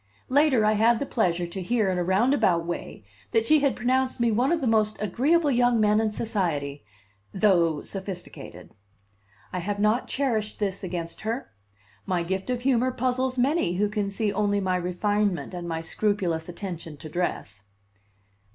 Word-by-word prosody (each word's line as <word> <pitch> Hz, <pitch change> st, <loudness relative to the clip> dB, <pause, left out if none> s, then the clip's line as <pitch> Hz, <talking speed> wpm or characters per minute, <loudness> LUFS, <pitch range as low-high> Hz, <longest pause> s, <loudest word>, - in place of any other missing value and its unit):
Later 265 Hz, -4 st, +4 dB
I 215 Hz, -, +4 dB
had 225 Hz, +2 st, +4 dB
the 280 Hz, -, -2 dB
pleasure 180 Hz, -9 st, 0 dB
to 175 Hz, +3 st, -6 dB
hear 220 Hz, +3 st, +1 dB
in 185 Hz, -1 st, 0 dB
a -, -, +1 dB
roundabout 190 Hz, -3 st, +2 dB
way 170 Hz, -9 st, -6 dB, 0.3 s
that 225 Hz, -1 st, +1 dB
she 310 Hz, +5 st, +5 dB
had 280 Hz, -2 st, +1 dB
pronounced 255 Hz, +1 st, 0 dB
me 235 Hz, -1 st, +2 dB
one 245 Hz, +7 st, +2 dB
of 340 Hz, -, +2 dB
the 275 Hz, -, -2 dB
most 215 Hz, -2 st, +2 dB
agreeable 285 Hz, -, +2 dB
young 245 Hz, -2 st, +3 dB
men 210 Hz, 0 st, +3 dB
in 220 Hz, -1 st, 0 dB
society, 165 Hz, -, -2 dB, 0.5 s
though 175 Hz, -6 st, +3 dB
sophisticated. 190 Hz, -2 st, -7 dB, 0.8 s
I 180 Hz, -, -1 dB
have 200 Hz, +3 st, -3 dB
not 215 Hz, +4 st, +2 dB
cherished 225 Hz, -6 st, -1 dB
this 200 Hz, -1 st, -2 dB
against 170 Hz, -2 st, -5 dB
her; 230 Hz, +5 st, -4 dB, 0.6 s
my 180 Hz, -2 st, 0 dB
gift 190 Hz, +5 st, -3 dB
of 250 Hz, -1 st, -1 dB
humor 255 Hz, -1 st, +2 dB
puzzles 255 Hz, +1 st, -1 dB
many 260 Hz, -, +2 dB
who 205 Hz, +3 st, +1 dB
can 210 Hz, -2 st, -1 dB
see 205 Hz, +1 st, -1 dB
only 205 Hz, 0 st, +1 dB
my 185 Hz, -2 st, 0 dB
refinement 195 Hz, +2 st, -1 dB
and 175 Hz, -1 st, -5 dB
my 165 Hz, 0 st, -2 dB
scrupulous 175 Hz, -2 st, -1 dB
attention 170 Hz, -4 st, -7 dB
to 155 Hz, -, -9 dB
dress. 115 Hz, -, -3 dB
210 Hz, 170 wpm, -26 LUFS, 180-240 Hz, 0.8 s, she